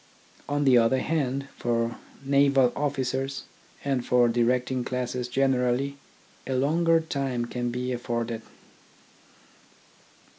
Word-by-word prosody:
On 145 0 +1
the 130 -3 +6
other 115 +3 +3
hand, 140 -2 -1
for 115 -1 -1 0.3
naval 140 -2 +4
officers, 135 -1 -2 0.4
and 135 -3 0
for 120 0 +4
directing 125 +2 +1
classes 125 0 -3
generally, 130 +1 +1 0.5
a 130 - -1
longer 165 +5 +3
time 135 -6 -2
can 120 0 -3
be 125 +1 -3
afforded. 120 -1 -3
130 Hz, 105 wpm, -26 LUFS, 120-140 Hz, 0.5 s, the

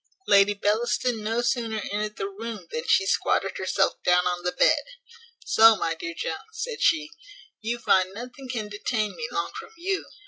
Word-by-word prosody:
Lady 200 +1 +5
Bellaston 220 +2 0
no 225 +3 0
sooner 235 -2 0
entered 210 +1 -2
the 195 - -2
room, 210 -1 -7
than 155 - -4
she 195 - +4
squatted 195 0 0
herself 195 +1 0
down 180 0 +4
on 180 -1 -1
the 180 - 0
bed: - - +3 0.6
"So, 225 0 +7
my 165 -5 -1
dear 170 +1 -6
Jones," 160 - -3
said 450 +1 -5
she, 315 -1 +2 0.5
"you 230 +2 -2
find 190 -5 +2
nothing 250 +5 -9
can 225 -4 -3
detain 210 +1 -2
me 470 - -4
long 395 -1 -2
from 450 -3 -11
you. 380 +3 -2
215 Hz, 175 wpm, -25 LUFS, 195-245 Hz, 0.6 s, So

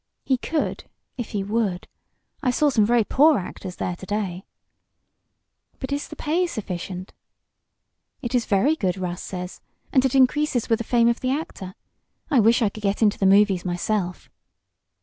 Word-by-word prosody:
"He 260 -2 +1
could 315 +3 -2 0.3
if 240 - -5
he 200 -2 -2
would. 205 -3 -1 0.5
I 265 - +1
saw 290 +4 +3
some 215 -5 +3
very 240 -1 +4
poor 295 +6 +4
actors 180 0 -6
there 180 - -3
to 190 - -9
day." 195 -3 -3 1.3
"But 265 - -6
is 285 +1 -2
the 310 - -9
pay 335 +5 0
sufficient?" 185 - -6 1.1
"It 240 -2 -5
is 245 -2 +1
very 215 +11 +3
good, 190 - -1
Russ 180 -1 -4
says. 180 -1 -6 0.3
And 260 - +5
it 265 0 +1
increases 265 -1 +2
with 225 - +3
the - - -2
fame 235 -1 +3
of 235 0 +2
the 255 - -1
actor. 260 - -4 0.6
I 275 - +5
wish 230 +2 +4
I 210 - +3
could 215 - -10
get 200 +2 0
into 210 -2 +3
the 195 - +3
movies 195 -2 +4
myself." 180 +1 -2
215 Hz, 170 wpm, -24 LUFS, 190-260 Hz, 1.3 s, And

